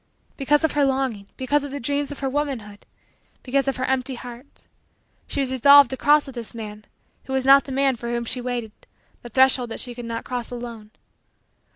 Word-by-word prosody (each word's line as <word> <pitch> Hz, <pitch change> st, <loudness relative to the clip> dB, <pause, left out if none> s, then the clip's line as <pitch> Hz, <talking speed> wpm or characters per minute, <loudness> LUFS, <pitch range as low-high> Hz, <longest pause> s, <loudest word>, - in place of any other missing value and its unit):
Because 295 Hz, +2 st, +2 dB
of 320 Hz, -, +2 dB
her 290 Hz, -, +1 dB
longing 260 Hz, -7 st, -1 dB
because 285 Hz, +3 st, 0 dB
of 285 Hz, -, -5 dB
the 285 Hz, +1 st, -5 dB
dreams 285 Hz, +3 st, -1 dB
of 290 Hz, -, -8 dB
her 270 Hz, -, -1 dB
womanhood 260 Hz, -8 st, -4 dB, 0.6 s
because 275 Hz, +1 st, 0 dB
of 270 Hz, -, -1 dB
her 255 Hz, -, -1 dB
empty 260 Hz, 0 st, -1 dB
heart 245 Hz, +2 st, -12 dB, 0.6 s
she 280 Hz, -, -2 dB
was 260 Hz, -1 st, -2 dB
resolved 280 Hz, +2 st, +7 dB
to -, -, -2 dB
cross 295 Hz, +2 st, +4 dB
with 270 Hz, -, -9 dB
this 235 Hz, -2 st, -7 dB
man, 210 Hz, -2 st, -8 dB, 0.4 s
who 265 Hz, -, -6 dB
was 265 Hz, -1 st, 0 dB
not 275 Hz, +1 st, +7 dB
the 275 Hz, -, -8 dB
man 270 Hz, 0 st, +2 dB
for 235 Hz, 0 st, -6 dB
whom 235 Hz, 0 st, -2 dB
she 250 Hz, +2 st, -1 dB
waited, 240 Hz, -3 st, -4 dB, 0.5 s
the 240 Hz, -, -10 dB
threshold 260 Hz, 0 st, +3 dB
that -, -, -6 dB
she 245 Hz, -, -4 dB
could 240 Hz, 0 st, -8 dB
not 230 Hz, 0 st, -5 dB
cross 245 Hz, -2 st, -4 dB
alone. 235 Hz, -3 st, -8 dB
260 Hz, 210 wpm, -23 LUFS, 235-275 Hz, 0.6 s, resolved